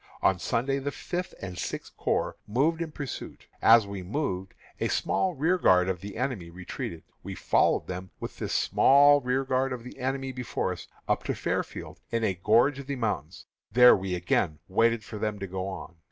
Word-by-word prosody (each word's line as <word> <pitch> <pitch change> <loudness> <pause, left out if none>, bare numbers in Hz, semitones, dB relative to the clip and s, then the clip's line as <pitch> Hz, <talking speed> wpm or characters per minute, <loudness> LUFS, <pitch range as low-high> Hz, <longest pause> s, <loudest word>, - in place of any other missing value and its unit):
On 95 -2 +3
Sunday 135 +8 0
the 140 +1 -2
Fifth 175 +5 -5
and 90 -2 -6
Sixth - - -5
Corps - - -1
moved 150 +10 +1
in 165 -2 -3
pursuit. 140 -3 -7 0.2
As 115 -1 +7
we 100 -1 -6
moved, 95 - -3 0.2
a - - +1
small 185 -3 0
rearguard 135 - +3
of 95 -2 -2
the 100 +1 -7
enemy 120 -9 -2
retreated. 85 -2 -6 0.2
We - - -6
followed - - +2
them, 90 +1 -6
with - - -7
this - - -3
small 145 +1 +5
rearguard 130 +1 0
of 125 -2 -5
the 125 - -11
enemy 135 +1 -2
before 125 -1 -2
us, - - -7 0.2
up - - +1
to - - -1
Fairfield, - - -3
in 115 -1 -1
a 100 - +2
gorge 115 +10 +3
of 140 - -8
the 140 - -2
mountains. 115 -5 -3 0.3
There 125 +2 +8
we 95 -1 -2
again 85 -2 0
waited 115 +3 +2
for 105 - -8
them 105 -1 -1
to 100 - -5
go 95 0 -4
on. 95 -2 -7
115 Hz, 185 wpm, -28 LUFS, 95-135 Hz, 0.3 s, There